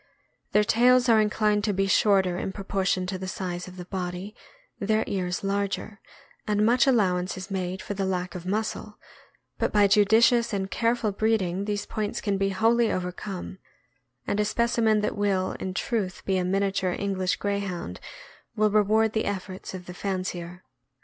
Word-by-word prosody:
Their 210 - +4
tails 245 +4 +4
are 220 -2 +6
inclined 210 -1 +1
to 210 - +1
be 195 +1 +1
shorter 190 -2 +3
in 190 - -3
proportion 190 -2 -1
to 185 0 -4
the 190 - -5
size 180 -1 -4
of 185 0 -11
the 180 - -7
body, 180 +2 -5 0.5
their 215 +2 +1
ears 180 -2 -2
larger, 200 +1 -2 0.5
and 210 0 +2
much 245 +4 +4
allowance 185 -7 +2
is 185 +2 -8
made 185 0 -3
for 205 - -4
the 195 0 -2
lack 180 -1 -2
of 180 -2 -7
muscle; 210 +2 -3 0.6
but - - +1
by 205 -1 +5
judicious 225 +4 +4
and 195 -1 -2
careful 230 -2 +1
breeding 200 -3 0
these 205 -1 -2
points 210 -1 -3
can 200 -2 -1
be 195 0 +1
wholly 225 +4 +2
overcome, 185 +1 -5 0.7
and 205 - -1
a - - +4
specimen 220 0 +2
that 210 - -1
will, 195 -2 0
in 190 - -3
truth, 200 -5 -2
be 190 -1 +1
a - - 0
miniature 190 -1 0
English 190 -2 -1
Grey 200 0 -1
hound 175 - -5 0.6
will 215 0 +2
reward 215 +1 +3
the 220 - 0
efforts 190 -1 -5
of 180 -1 -8
the 180 - -8
fancier. 180 -2 -4
200 Hz, 170 wpm, -26 LUFS, 185-215 Hz, 0.7 s, are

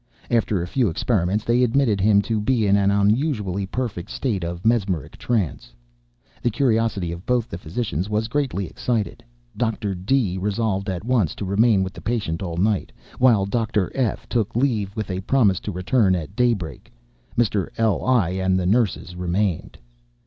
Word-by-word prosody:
After 110 -6 +1
a - - -5
few 120 +2 +1
experiments, 100 +3 0
they 120 +2 +3
admitted 120 -5 +2
him 100 0 +4
to 110 0 -1
be 115 0 +1
an 100 0 +4
unusually 100 - +1
perfect 110 -4 -4
state 120 -7 -2
of 85 +2 -5
mesmeric 100 - 0
trance. 100 - -2 0.7
The 120 - +1
curiosity 115 - +1
of 85 +1 -7
both 125 -2 +1
the 85 - -6
physicians 90 - -3
was 110 +1 0
greatly 130 -6 -1
excited. 110 +6 -2 0.3
Dr. 110 -4 -1
D—— 95 0 0
resolved 100 0 -1
at 95 +2 -4
once 115 -10 +1
to 100 - -5
remain 100 +1 +3
with 95 0 -5
the - - -10
patient 105 -9 -2
all 85 -3 -4
night, 100 +2 +1 0.3
while 115 -6 +5
Dr. 105 -2 0
F—— 125 -6 -1
took 110 -4 -1
leave 115 -6 +1
with 105 -3 -3
a 90 - -2
promise 105 -4 +3
to 105 - -5
return 95 +2 +2
at 90 +2 -5
daybreak. 105 - -1 0.5
Mr. 105 -5 +1
L—l 115 0 +2 0.2
and 95 0 +2
the 90 - -2
nurses 100 -3 +1
remained. 90 0 -1
105 Hz, 165 wpm, -23 LUFS, 95-120 Hz, 0.7 s, while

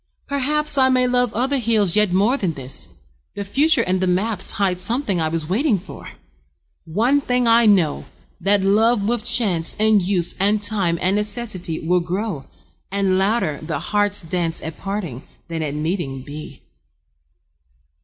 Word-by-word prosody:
Perhaps 285 +1 0
I 260 0 +5
may 255 -1 +3
love 250 -1 +1
other 265 +4 0
hills 215 -6 +1
yet 210 -3 +3
more 205 +8 +2
Than 190 -11 -2
this: 135 -2 -3 0.5
the 200 - -5
future 280 +5 +3
and 185 -1 -1
the 185 - +1
maps 190 +2 0
Hide 190 -4 0
something 215 - 0
I 160 - +1
was 160 -1 -3
waiting 220 - +1
for. 180 - -11 0.7
One 235 - +1
thing 250 -2 0
I 230 0 +5
know, 180 -8 +2 0.3
that 195 +2 +2
love 210 +2 +2
with 235 -1 -1
chance 215 -9 +2
And 215 -1 +4
use 180 -2 0
and 205 +2 +1
time 195 -5 +1
and 185 +2 +2
necessity 210 -6 -2
Will 180 +1 +3
grow, 180 -3 -4 0.5
and 195 -1 +1
louder 195 -7 0
the 155 0 -4
heart's 205 -1 +1
dance 165 0 -2
At 160 0 -7
parting 195 - -5 0.3
than 165 -1 -3
at 150 -2 -3
meeting 150 -4 -3
be. 145 -1 -10
200 Hz, 160 wpm, -20 LUFS, 175-230 Hz, 0.7 s, I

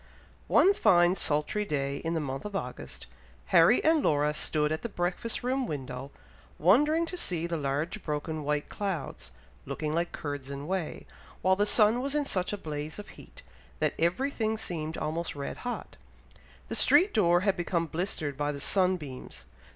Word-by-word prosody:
One 390 - +5
fine 175 - +5
sultry 155 +4 0
day 140 -6 -2
in 165 +2 -3
the - - +1
month 135 -2 -4
of 210 -1 -6
August, 195 - -6 0.5
Harry - - +6
and 320 -1 +4
Laura 150 - +2
stood 150 0 0
at 155 - -1
the 235 - -4
breakfast 180 +6 -2
room 255 0 0
window, 130 -3 -5 0.5
wondering 295 - +4
to 350 - -6
see 175 - -1
the 170 0 -2
large 150 +7 -2
broken 150 0 -3
white 150 0 -1
clouds, 195 -5 -4 0.3
looking 155 0 -3
like 170 +2 0
curds 145 -2 -5
and 140 +1 -6
whey, 185 -3 -3 0.4
while 185 0 +4
the 205 +2 +1
sun 220 +3 +4
was 275 +2 -1
in 295 -1 +1
such 185 -8 -1
a 205 - -2
blaze 155 -3 -5
of 210 0 -9
heat, - - -14 0.3
that - - +1
every 185 +12 +1
thing 220 -4 -1
seemed 160 -6 -4
almost 165 +1 -3
red 140 -1 -5
hot. 245 -1 -6 0.7
The - - -5
street 380 +4 +5
door 175 -4 +4
had 195 0 +2
become 170 -1 -1
blistered 160 -3 -2
by 145 +1 -1
the 140 - -6
sun 185 +4 +2
beams. 135 -6 -9
170 Hz, 175 wpm, -29 LUFS, 150-210 Hz, 0.7 s, Harry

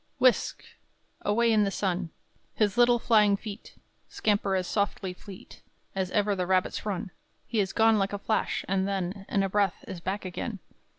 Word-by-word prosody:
Whisk! 255 -1 +2 0.6
away 230 +3 +2
in 215 -1 +4
the 200 - +1
sun 185 -3 -1 0.5
His 205 -3 +1
little 240 0 +5
flying 215 -4 +4
feet 205 -1 -9 0.3
Scamper 205 -2 +1
as 185 -1 0
softly 200 -1 -1
fleet 190 +1 -13 0.3
As 190 -1 -1
ever 205 +1 +1
the 180 -2 -2
rabbits 185 +3 0
run. 185 -2 -3 0.3
He 225 - -1
is 195 -2 +1
gone 225 0 +4
like 195 0 0
a 205 - -2
flash, 220 +2 -1
and 190 0 +1
then 195 0 -3
In 195 - +2
a - - +1
breath 200 -2 0
is 180 - -6
back 190 +4 -3
again. 200 +4 -4
200 Hz, 175 wpm, -28 LUFS, 190-210 Hz, 0.6 s, little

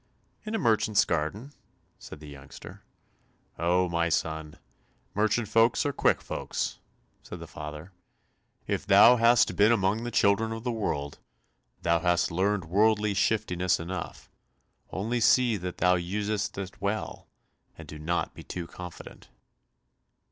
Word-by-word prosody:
"In 215 - -2
a - - +1
merchant's 110 - +2
garden," 90 - -3 0.5
said - - -11
the 75 - -10
youngster. 70 -2 -12 0.8
"Oh, 90 +2 +2
my 85 0 0
son, 80 -1 -2 0.6
merchant 110 +2 +1
folks 115 +5 +3
are 145 - 0
quick - - +1
folks," - - -4 0.4
said - - -9
the - - -8
father. 75 +4 -9 0.7
"If - - -3
thou 125 +1 +7
hast 115 -5 +4
been 105 +4 +5
among 105 0 +1
the 120 - -3
children 110 0 +2
of 115 0 -7
the 125 - -1
world, 75 -11 -3 0.6
thou 85 0 +2
hast 90 0 +1
learned 95 +2 0
worldly 105 +3 +2
shiftiness 90 -4 0
enough, 85 +1 -7 0.6
only 115 +6 -2
see 120 0 +4
that 90 -1 -6
thou 90 +1 +3
usest 105 +4 -2
it 95 0 -7
well, 100 +2 -3 0.5
and - - -11
do 75 - -9
not 85 +3 -2
be - - -11
too 90 -2 -6
confident." 90 0 -11
100 Hz, 140 wpm, -27 LUFS, 85-110 Hz, 0.8 s, thou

